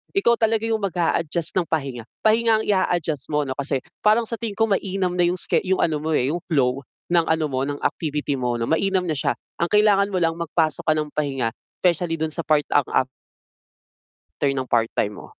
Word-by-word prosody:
ikaw 235 -12 +4
talaga 225 0 +2
'yung 220 -2 -1
mag-a-adjust 170 -3 0
ng 175 -3 +1
pahinga. 135 -7 -2 0.2
Pahinga 225 0 +4
ang - - -6
i-a-adjust 175 -7 0
mo 150 0 +1
ano 130 - -3
kasi 140 -1 -1 0.2
parang 220 +2 +4
sa 230 - -2
tingin 225 -3 -4
ko 225 - +4
mainam 195 -3 -1
na 180 - +2
'yung 180 +1 0
ske - - +1
'yung 190 0 0
ano 155 -3 +1
mo, 160 - -1
eh, 125 - +2
'yung 175 - -3
flow 135 -2 +1 0.3
ng 170 -1 +4
ano 160 -1 +1
mo, 130 0 0
ng 145 0 -4
activity 150 -2 -1
mo 125 -2 -1
'no, 115 - -1
mainam 190 +3 +1
na 155 - -1
siya. - - 0 0.2
Ang 170 - +1
kailangan 205 -1 +4
mo 185 - 0
lang 165 -1 +1
magpasok 160 -1 0
ka - - +5
ng 150 -1 -3
pahinga, 135 -6 -1 0.3
specially 170 -2 +1
dun 160 0 -1
sa 165 - -3
part 150 -1 +2
ang 145 -2 +4
af 130 - +2 1.3
ter 140 - +2
ng 130 -1 -2
part-time 115 -3 0
mo. - - -10
165 Hz, 210 wpm, -23 LUFS, 145-195 Hz, 1.3 s, ka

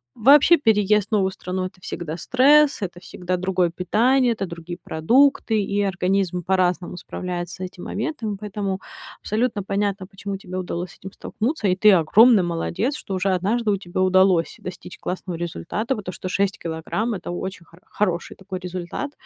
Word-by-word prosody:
Вообще, 285 +8 +6
переезд 210 -5 +3
в - - -44
новую 190 -2 +2
страну- 185 0 -4
это 185 0 -9
всегда 165 -2 -5
стресс, 280 - +4
это 175 -2 -5
всегда 180 0 -4
другое 185 -1 +1
питание, 240 +8 +2
это 200 -3 -3
другие 170 0 -7
продукты, 225 - +3
и 200 +1 -1
организм 190 -2 0
по-разному 180 -1 0
справляется 175 0 -5
с - - -31
этим 185 -1 -7
моментом. 220 -4 -3
Поэтому 200 -2 -4 0.4
абсолютно 220 -1 -1
понятно, 200 -1 -2
почему 195 0 -6
тебе 185 -1 -7
удалось 175 -1 -4
с - - -17
этим 190 +1 -10
столкнуться, 230 0 -2
и 180 - +2
ты 210 +1 +6
огромный 195 +5 +6
молодец, 175 - -2
что 195 - -7
уже 190 +1 0
однажды 210 +5 0
у 200 - +1
тебя 185 0 -4
удалось 185 -2 +3
достичь 180 -2 -9
классного 180 -2 -4
результата. 175 - -3
Вот 210 - -8
то, 180 - -4
что 185 - -7
6 195 +1 0
килограмм- 170 +8 -3
это 180 - -5
очень 185 0 -5
хор 170 +2 -20
хороший 180 -5 -2
такой 190 -1 -7
результат. 180 - -5
190 Hz, 170 wpm, -23 LUFS, 180-215 Hz, 0.4 s, Вообще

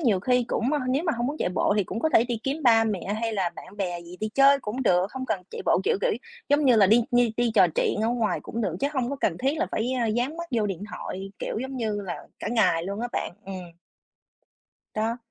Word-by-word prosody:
nhiều 220 - +2
khi 250 +2 +2
cũng 250 +6 0
ơ, 300 - +2
nếu 275 +7 +1
mà 325 - +1
hông 240 - -1
muốn 290 +3 -2
chạy - - 0
bộ 185 +2 +1
thì 205 - +2
cũng 225 - -5
có 315 - +2
thể 235 -6 +4
đi 240 -2 -2
kiếm 285 +3 -2
ba 225 -3 +5
mẹ 205 -2 -2
hay 225 -1 -1
là 190 -4 0
bạn 200 - -11
bè 180 -4 -2
gì 175 +1 -11
đi 215 - -1
chơi 275 0 +6
cũng 245 +5 -3
được, 180 -4 +3
không 260 -1 -5
cần 190 -7 -1
chạy - - -6
bộ. - - +4
Kiểu, - - +2
kiểu, - - +2 0.4
giống 290 +1 +3
như 250 -4 +6
là 200 -3 +6
đi 225 +4 +5
đi 245 -2 +3
đi 240 -1 +2
trò 180 - +7
chuyện - - +1
ở 225 - +2
ngoài 225 -6 0
cũng 230 - -5
được, 185 -6 -1
chứ 280 - +2
hông 255 -1 0
có 280 - -3
cần 170 -3 0
thiết 275 +5 0
là 345 - +1
phải, 240 +4 0
a, 235 - +1
dán 245 +8 -1
mắt 340 0 -5
vô 225 -4 +1
điện 195 -1 -4
thoại, 195 +1 -6
kiểu - - -3
giống 265 0 -5
như 215 -4 -1
là, 180 -3 -4 0.2
cả - - -4
ngày 185 -8 +2
luôn 200 +2 -4
á 245 - -2
bạn, - - -2
ừm. 195 0 -6 1.4
Đó. 225 +2 -1
225 Hz, 270 wpm, -26 LUFS, 200-255 Hz, 1.4 s, trò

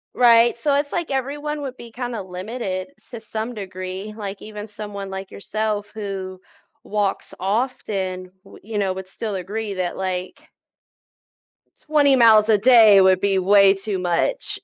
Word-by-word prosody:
Right, 235 -1 +5
so 285 +4 0
it's 285 0 0
like 345 -5 -3
everyone 290 +3 -3
would 260 -2 -6
be 235 -1 -11
kinda 240 -2 -4
limited 185 +2 -5
s - - -26
to 235 - -6
some 220 +2 -5
degree, 190 0 -6
like 200 -2 -6
even 210 0 -8
someone 205 -2 -7
like 190 0 -6
yourself 210 0 -3
who 190 -3 -6 0.4
walks 205 -2 -2
often, 190 -4 -2
w 195 - -15
you 215 +1 -5
know, 190 -2 0
would 190 0 -7
still 210 +1 -5
agree 200 +2 -4
that, 180 -1 -3
like 185 -1 -4 1.4
20 290 -3 +4
miles 225 -3 +6
a 215 - +5
day 220 -3 +7
would 190 -1 +5
be 195 -1 +2
way 195 +1 +6
too 195 0 -4
much. 180 - -1
210 Hz, 155 wpm, -22 LUFS, 190-235 Hz, 1.4 s, day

